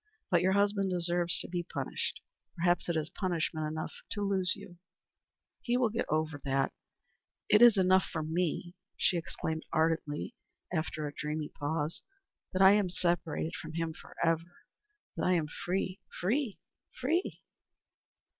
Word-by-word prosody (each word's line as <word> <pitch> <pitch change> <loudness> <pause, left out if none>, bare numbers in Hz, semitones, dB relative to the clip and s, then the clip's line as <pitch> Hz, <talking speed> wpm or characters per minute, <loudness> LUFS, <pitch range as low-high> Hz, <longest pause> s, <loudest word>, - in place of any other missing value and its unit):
But 175 -2 +5
your 190 +1 +3
husband 200 -1 +2
deserves 175 -1 +1
to - - -5
be 175 0 -2
punished. 175 - -3 0.3
Perhaps 175 0 +2
it 170 - +1
is 155 -1 -2
punishment 165 -4 -1
enough 155 +1 -4 0.2
to 205 - -2
lose 190 -2 +2
you." 195 -4 -12 0.8
"He 245 0 +1
will 250 -3 +3
get 230 +2 -2
over 155 -1 0
that. 135 0 +1 0.8
It 210 - +6
is 240 -3 +9
enough 185 0 +5
for 160 - -2
me," 175 +2 -1 0.2
she - - +3
exclaimed, 160 -1 -3
ardently, 160 +3 0 0.4
after 155 -2 -1
a 145 - -4
dreamy 150 0 -3
pause, 150 +2 -2 0.5
"that 190 +1 +3
I 190 - +10
am 205 -2 +3
separated 175 -2 0
from 160 - -7
him 165 -1 -1
forever 165 +2 -2 0.5
that - - -1
I 185 - +4
am 165 -3 +2
free 185 +4 -2 0.2
free 225 +4 0 0.4
free." 320 +9 0
175 Hz, 145 wpm, -32 LUFS, 160-190 Hz, 0.8 s, I